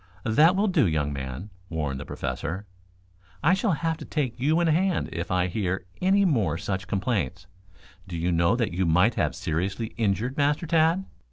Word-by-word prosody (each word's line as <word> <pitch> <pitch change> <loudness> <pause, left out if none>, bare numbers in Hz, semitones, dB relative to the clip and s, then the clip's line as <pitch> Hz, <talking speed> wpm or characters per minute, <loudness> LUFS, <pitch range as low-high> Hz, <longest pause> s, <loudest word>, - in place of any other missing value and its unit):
"That 150 +11 +5
will 205 +2 +2
do, 160 - +3
young 75 -3 0
man," 70 +9 -6 0.2
warned 75 -5 -2
the - - -8
Professor. 95 +6 -4 0.8
"I 175 - +5
shall 195 0 +1
have 165 +1 -1
to - - -8
take 130 -7 -2
you 155 +6 +2
in 175 - +2
hand 175 +3 +1
if 85 - -4
I 90 -1 +2
hear 90 0 -2 0.2
any 195 +2 +4
more 105 - +1
such 95 +2 -3
complaints. 95 -4 -1 0.6
Do 85 -2 -5
you 85 +2 0
know 85 +6 +3
that 115 -7 -1
you 90 0 0
might 90 +8 +4
have - - 0
seriously 95 +5 -2
injured 115 +4 0
Master 145 +3 +1
Tad? 165 +3 +2
105 Hz, 180 wpm, -26 LUFS, -, 0.8 s, That